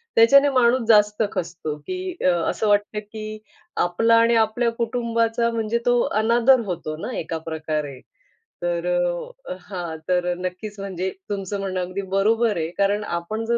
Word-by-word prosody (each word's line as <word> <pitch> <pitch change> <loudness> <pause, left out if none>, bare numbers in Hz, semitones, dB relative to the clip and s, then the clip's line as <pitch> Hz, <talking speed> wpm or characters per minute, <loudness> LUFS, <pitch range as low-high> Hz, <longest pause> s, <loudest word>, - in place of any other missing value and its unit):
त्याच्याने 275 +5 +7
माणूस 255 -1 +3
जास्त 210 -1 +4
खचतो, 170 -4 -4
की 370 -1 -4
अ, 185 - +6 0.2
असं 220 - -1
वाटतं 205 +1 +1
की 215 0 -8 0.5
आपला 225 +7 +3
आणि 230 0 +4
आपल्या 225 +2 +2
कुटुंबाचा 235 0 0
म्हणजे 225 0 -1
तो 245 0 +4 0.2
अनादर 240 +3 +4
होतो 170 -5 -4
ना - - -4
एका 165 0 -4
प्रकारे. 155 -4 -3 0.6
तर - - -1 0.8
हां. 175 -5 -6
तर 180 -1 +1
नक्कीच 185 +3 -6
म्हणजे 190 -1 -3 0.2
तुमचं 200 0 -3
म्हणणं 190 -1 -2
अगदी 185 +2 -4
बरोबर 215 +1 +2
आहे 160 0 -2
कारण 205 +1 +1
आपण 210 +6 -3
जर 235 +1 +1
210 Hz, 145 wpm, -23 LUFS, 180-230 Hz, 0.8 s, त्याच्याने